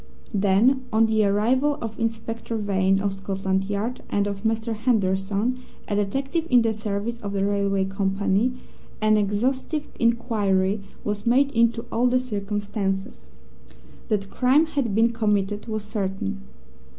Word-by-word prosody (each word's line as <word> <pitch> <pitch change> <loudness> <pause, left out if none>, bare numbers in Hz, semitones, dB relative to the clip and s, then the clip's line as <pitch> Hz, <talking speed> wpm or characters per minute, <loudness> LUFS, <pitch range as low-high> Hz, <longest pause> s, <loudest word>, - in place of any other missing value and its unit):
Then, 210 +7 +3
on 225 +1 +4
the 220 -1 +2
arrival 255 +9 +2
of 225 -1 -6
Inspector 225 0 -3
Vane, 195 -2 +2
of 200 0 -1
Scotland 195 0 -2
Yard, 205 +5 -3
and 205 0 +1
of 200 -1 -4
Mr. 225 +1 -1
Henderson, 210 +1 0 0.3
a 205 - -1
detective 270 - -1
in 245 -2 +5
the 225 -1 +1
service 215 +2 -3
of 200 -3 -5
the 195 0 +1
railway 200 -1 +1
company, 195 +3 +1 0.5
an 215 0 +4
exhaustive 255 +9 0
inquiry 210 -4 +1 0.2
was 210 +1 -3
made 270 +4 +4
into 230 0 +2
all 240 +2 +2
the 255 +1 +3
circumstances. 200 - -3 0.8
That 200 -2 -1
crime 265 +5 +4
had 275 -10 -1
been 230 +2 +4
committed 210 -2 0
was 215 -2 -3
certain. 195 - -3
210 Hz, 140 wpm, -24 LUFS, 195-235 Hz, 0.8 s, in